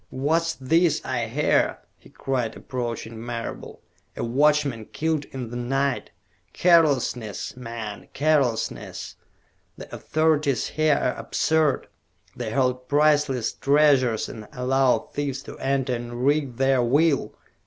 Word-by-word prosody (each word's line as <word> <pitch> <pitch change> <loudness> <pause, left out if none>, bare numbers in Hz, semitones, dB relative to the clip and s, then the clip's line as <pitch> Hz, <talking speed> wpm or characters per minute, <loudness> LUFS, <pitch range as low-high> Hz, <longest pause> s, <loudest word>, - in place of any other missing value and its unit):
"What's 165 +5 0
this 165 +5 +2
I 120 -3 -1
hear?" 145 +7 +1 0.2
he - - -19
cried, 125 -4 -2
approaching 115 -2 -5
Marable. 115 -1 -6 0.3
"A - - -2
watchman 140 -1 +2
killed 155 +1 -2
in 125 -4 -7
the - - -6
night? 135 +2 -1 0.4
Carelessness, 140 - +2
man, 115 -4 -7
carelessness! 140 -6 -1 0.6
The - - -11
authorities 155 -5 +1
here 155 -1 +2
are 125 - 0
absurd! 160 -3 +1 0.5
They - - -4
hold 125 -1 0
priceless 145 -5 +2
treasures 140 -5 +3
and 110 -2 -9
allow 130 +1 +1
thieves 140 -2 -3
to - - -9
enter 135 -1 0
and 120 +1 -4
wreak 140 -4 +1
their 135 -1 +3
will. 140 +4 +2
135 Hz, 120 wpm, -24 LUFS, 120-150 Hz, 0.6 s, treasures